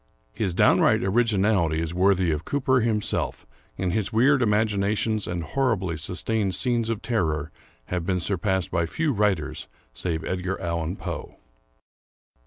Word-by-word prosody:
His 95 Hz, -5 st, -1 dB
downright -, -, +4 dB
originality 95 Hz, -6 st, +2 dB
is 85 Hz, 0 st, -3 dB
worthy 95 Hz, -1 st, +3 dB
of 75 Hz, 0 st, -2 dB
Cooper 130 Hz, +3 st, +1 dB
himself, 110 Hz, -3 st, -1 dB, 0.3 s
and 90 Hz, -2 st, -1 dB
his 110 Hz, -2 st, -1 dB
weird 130 Hz, +5 st, +4 dB
imaginations 105 Hz, 0 st, +1 dB
and 85 Hz, -1 st, -3 dB
horribly 100 Hz, -7 st, 0 dB
sustained 95 Hz, +5 st, -1 dB
scenes 120 Hz, -3 st, 0 dB
of 115 Hz, -1 st, -3 dB
terror 80 Hz, -10 st, -1 dB, 0.3 s
have 90 Hz, +3 st, -3 dB
been 90 Hz, +1 st, 0 dB
surpassed 95 Hz, 0 st, -1 dB
by 85 Hz, -1 st, 0 dB
few 155 Hz, -, -1 dB
writers 100 Hz, -, -1 dB, 0.3 s
save 80 Hz, +2 st, -3 dB
Edgar 95 Hz, +1 st, -2 dB
Allan 85 Hz, 0 st, -2 dB
Poe. -, -, -6 dB
95 Hz, 135 wpm, -25 LUFS, 85-110 Hz, 0.3 s, downright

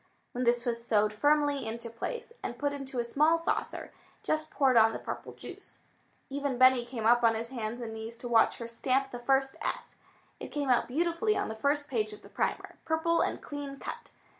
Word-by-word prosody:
When 250 Hz, +1 st, -2 dB
this 240 Hz, +1 st, +3 dB
was 235 Hz, -1 st, -1 dB
sewed 210 Hz, -2 st, +2 dB
firmly 290 Hz, +1 st, +2 dB
into 230 Hz, +1 st, -4 dB
place, 465 Hz, -, -5 dB
and 240 Hz, -, -5 dB
put 285 Hz, +1 st, -1 dB
into 270 Hz, -2 st, -6 dB
a 240 Hz, -, +2 dB
small 305 Hz, +7 st, +3 dB
saucer, 330 Hz, -, -2 dB, 0.3 s
Jess 310 Hz, 0 st, 0 dB
poured 270 Hz, -5 st, +3 dB
on 225 Hz, -1 st, +6 dB
the -, -, -2 dB
purple -, -, -6 dB
juice. -, -, -10 dB, 0.5 s
Even 280 Hz, -2 st, -2 dB
Benny 255 Hz, -1 st, +6 dB
came 235 Hz, -3 st, -4 dB
up 240 Hz, +1 st, +5 dB
on 225 Hz, -1 st, +5 dB
his 230 Hz, +2 st, -4 dB
hands 235 Hz, -1 st, -4 dB
and 225 Hz, -2 st, -5 dB
knees 220 Hz, +1 st, -6 dB
to 245 Hz, -, -6 dB
watch 230 Hz, -2 st, +4 dB
her 235 Hz, -, -6 dB
stamp 265 Hz, +3 st, 0 dB
the 245 Hz, -, -5 dB
first 270 Hz, +2 st, +1 dB
s. -, -, -3 dB, 0.5 s
It -, -, -6 dB
came 285 Hz, -3 st, -1 dB
out 245 Hz, -, +3 dB
beautifully 340 Hz, -, +1 dB
on -, -, -1 dB
the -, -, -3 dB
first 285 Hz, +6 st, 0 dB
page 215 Hz, -6 st, -1 dB
of 210 Hz, -, -12 dB
the -, -, -13 dB
primer, -, -, -2 dB
purple 330 Hz, +1 st, +1 dB
and -, -, -1 dB
clean 285 Hz, -1 st, -6 dB
cut. -, -, -7 dB
255 Hz, 210 wpm, -30 LUFS, 230-285 Hz, 0.5 s, on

